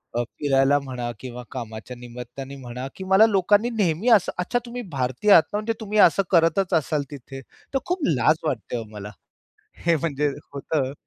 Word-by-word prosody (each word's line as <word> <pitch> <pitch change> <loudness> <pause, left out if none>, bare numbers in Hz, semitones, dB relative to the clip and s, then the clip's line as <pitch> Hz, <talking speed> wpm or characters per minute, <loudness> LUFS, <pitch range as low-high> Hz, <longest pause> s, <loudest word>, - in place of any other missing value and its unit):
अ, 120 - +1
फिरायला 135 +2 +2
म्हणा 125 -3 -5
किंवा 125 -1 -8
कामाच्या 115 0 -7
निमित्ताने 125 +3 -9
म्हणा, 125 -1 -7
की 190 - -7
मला 190 +3 +6
लोकांनी 205 +2 +3
नेहमी 205 -2 0
असं, 215 -6 +5
"अच्छा 180 +7 0
तुम्ही 245 +1 -6
भारतीय 130 - 0
आहात 165 - +9
ना - - +1
म्हणजे 215 +2 -1
तुम्ही 215 -1 -3
असं 195 +1 +6
करतच 170 +2 +3
असाल 155 -2 +1
तिथे." 135 -1 -9 0.3
तर 270 - +2
खूप 360 +1 -1
लाज 155 0 +3
वाटते 150 - -2
हो 115 - -4
मला, 105 -1 -8 0.8
हे 170 -1 +4
म्हणजे 150 -2 -1 0.2
होतं. 140 -1 -2
150 Hz, 175 wpm, -24 LUFS, 125-195 Hz, 0.8 s, आहात